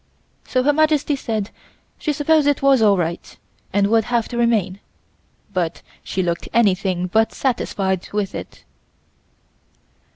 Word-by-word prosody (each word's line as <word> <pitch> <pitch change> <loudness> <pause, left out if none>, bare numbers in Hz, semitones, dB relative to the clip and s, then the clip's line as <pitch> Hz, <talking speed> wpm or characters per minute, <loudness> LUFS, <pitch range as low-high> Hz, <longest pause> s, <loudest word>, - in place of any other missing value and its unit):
So 255 -1 +1
Her 290 +2 +3
Majesty 305 -1 +2
said 220 -6 -3 0.5
she 305 - -1
supposed 300 0 +2
it 290 -1 +1
was 275 -3 +5
all 205 -3 +5
right, 170 0 -4 0.3
and 200 0 +2
would 220 +1 +2
have 235 -1 0
to 240 - -5
remain, 210 -5 +1 0.7
but 170 -3 -2 0.2
she 190 - -2
looked 170 -1 -3
anything 190 -5 +2
but 220 +4 +2
satisfied 195 -7 -1
with 205 -2 -2
it. - - -8
220 Hz, 135 wpm, -20 LUFS, 190-265 Hz, 0.7 s, was